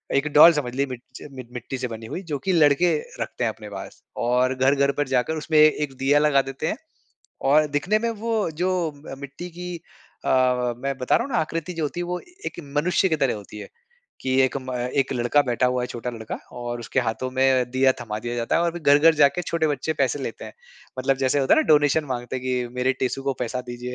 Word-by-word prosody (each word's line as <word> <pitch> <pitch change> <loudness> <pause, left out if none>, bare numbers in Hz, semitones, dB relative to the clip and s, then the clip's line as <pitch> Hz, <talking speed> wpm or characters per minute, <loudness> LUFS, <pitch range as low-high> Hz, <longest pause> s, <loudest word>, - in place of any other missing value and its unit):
एक 140 +2 +2
डॉल 165 +3 +9
समझ 130 -5 -3
लीजिए 140 +1 0
मि 130 -1 -6 0.2
च - - -9 0.3
मिट्टी 125 +2 -5
से 125 0 -3
बनी 115 -1 -8
हुई 185 - -4
जो 145 - 0
कि 190 - +2
लड़के 160 +2 +4 0.3
रखते - - -3
हैं - - +2
अपने - - -11
पास। - - -9 0.2
और 125 +2 +2
घर-घर 140 +2 +3
पर 145 - +1
जाकर 130 +4 0
उसमें 155 0 0
ए 155 - +9 0.2
एक 140 -2 -4
दीया 140 +3 +3
लगा 150 -2 +4
देते 135 +4 -4
हैं। - - -2 0.7
और 150 +2 +5
दिखने 160 +9 +1
में 235 +1 -1
वो 225 -2 -1
जो 180 +2 +1 0.4
अ, - - -5
मिट्टी 145 +6 -8
की 180 +1 -7 0.5
अ, - - 0 0.5
मैं 135 +1 -3
बता 125 -1 +1
रहा - - +1
हूँ 280 - -8
ना - - +2
आकृति 165 +3 -4
जो 165 -2 -3
होती 150 +4 -3
है - - -2
वो 180 0 -3 0.3
एक - - -6 0.2
मनुष्य 180 +5 +2
की 160 - +2
तरह 135 -4 +1
होती 105 +1 -10
है। - - -9 0.5
कि 130 0 +1
एक 130 - +1
म 130 0 -6 0.3
एक 135 - -1
लड़का 120 +3 +2
बैठा 125 +1 +1
हुआ 125 0 0
है - - -2
छोटा 125 0 -5
लड़का 110 -2 -6 0.2
और 120 0 -4
उसके 120 +3 -1
हाथों 120 +2 -2
में 130 -1 +2
दीया 130 +1 +3
थमा 105 -3 -4
दिया 120 +1 -4
जाता 115 -1 0
है 170 - +2
और 170 - +1
फ़िर 175 -1 -8
घर-घर 150 +3 +6
जाके 150 +3 +3
छोटे 165 -1 0
बच्चे 145 +2 -1
पैसे 140 -1 0
लेते - - -6
हैं। - - -9 0.5
मतलब 135 +1 +1
जैसे 135 +1 +1
होता 135 - +4
है - - +4
ना - - -1
डोनेशन 150 0 +4
माँगते 125 -2 -4
हैं 125 - -6
कि 125 -1 -1
मेरे 125 +1 +1
टेसू 130 +1 -1
को 135 0 0
पैसा 125 +1 -2
दीजिए। 120 +1 -6
135 Hz, 240 wpm, -24 LUFS, 125-155 Hz, 0.7 s, डॉल